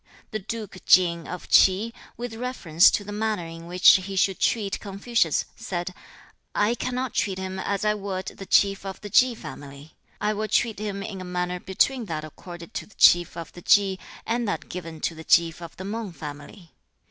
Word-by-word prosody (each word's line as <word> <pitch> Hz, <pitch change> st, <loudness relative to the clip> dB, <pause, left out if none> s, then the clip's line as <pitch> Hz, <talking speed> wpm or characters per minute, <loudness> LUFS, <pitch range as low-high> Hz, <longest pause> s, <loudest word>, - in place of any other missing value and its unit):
The 215 Hz, -, -2 dB
duke 215 Hz, -1 st, -6 dB
Ching 170 Hz, -2 st, +4 dB
of 180 Hz, -, -7 dB
Ch'i, 200 Hz, +5 st, +4 dB, 0.2 s
with 240 Hz, -1 st, -5 dB
reference 225 Hz, -9 st, +3 dB
to 205 Hz, -, -1 dB
the 205 Hz, -, -8 dB
manner 210 Hz, -3 st, -1 dB
in 165 Hz, 0 st, -9 dB
which 180 Hz, +1 st, +2 dB
he 190 Hz, +1 st, -6 dB
should 190 Hz, 0 st, +2 dB
treat 205 Hz, -4 st, 0 dB
Confucius, 200 Hz, -3 st, 0 dB
said, 185 Hz, -5 st, -4 dB, 0.6 s
'I 210 Hz, +3 st, +3 dB
cannot 255 Hz, 0 st, -3 dB
treat 190 Hz, -2 st, 0 dB
him 190 Hz, 0 st, -4 dB
as 200 Hz, +2 st, -2 dB
I 210 Hz, -, +3 dB
would 195 Hz, -2 st, -4 dB
the 195 Hz, -, -8 dB
chief 195 Hz, -1 st, +3 dB
of 195 Hz, -1 st, -6 dB
the 205 Hz, -, -8 dB
Chi 250 Hz, +1 st, +5 dB
family. 140 Hz, -6 st, -10 dB, 0.2 s
I 210 Hz, +1 st, +1 dB
will 215 Hz, +1 st, -2 dB
treat 220 Hz, 0 st, +1 dB
him 200 Hz, -2 st, -4 dB
in 195 Hz, -3 st, -6 dB
a -, -, -5 dB
manner 180 Hz, 0 st, -2 dB
between 230 Hz, +7 st, +1 dB
that 155 Hz, -5 st, -4 dB
accorded 175 Hz, +4 st, -11 dB
to -, -, -5 dB
the 215 Hz, -, -21 dB
chief 175 Hz, -1 st, +5 dB
of 165 Hz, -, -7 dB
the 175 Hz, -, -11 dB
Chi, 195 Hz, 0 st, +3 dB, 0.2 s
and 235 Hz, 0 st, -1 dB
that 205 Hz, -, -3 dB
given 165 Hz, -3 st, -7 dB
to -, -, -1 dB
the 160 Hz, 0 st, -10 dB
chief 170 Hz, 0 st, +3 dB
of 170 Hz, -1 st, -10 dB
the 185 Hz, -, -7 dB
Mang 210 Hz, -2 st, -4 dB
family.' 150 Hz, +4 st, -10 dB
190 Hz, 195 wpm, -25 LUFS, 175-215 Hz, 0.6 s, Chi